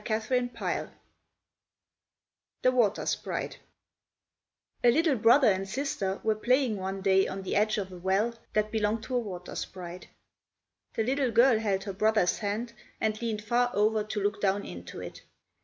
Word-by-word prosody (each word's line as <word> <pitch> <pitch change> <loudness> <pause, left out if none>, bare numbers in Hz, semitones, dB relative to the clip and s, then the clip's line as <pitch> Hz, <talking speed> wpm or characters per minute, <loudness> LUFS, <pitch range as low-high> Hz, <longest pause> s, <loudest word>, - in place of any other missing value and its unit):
THE 245 +2 -1 1.8
WATER 235 -6 +2
SPRITE - - -3 1.2
A 240 - +7
little 310 +3 +3
brother 240 +3 +5
and 195 0 -2
sister 200 -6 -2
were 220 - +3
playing 245 +1 +1
one 190 +1 -4
day 190 -1 +4
on 195 0 -5
the - - -2
edge 215 +1 +2
of 190 -2 -3
a 180 - -9
well 195 +6 +1 0.2
that 215 0 +1
belonged 220 0 0
to 255 - -4
a - - +3
water 185 -6 -7
sprite. 180 -1 -7 0.9
The 225 - +1
little 265 +2 +1
girl 235 0 +5
held 200 -3 0
her 200 - -5
brother's 215 -2 +2
hand, 220 +3 -3 0.3
and 215 0 -1
leaned 220 -3 -2
far 240 +3 +2
over 215 +1 +2
to 215 0 -4
look 205 0 -1
down 200 0 +1
into 85 0 -8
it. - - -8
215 Hz, 155 wpm, -29 LUFS, 195-235 Hz, 1.8 s, A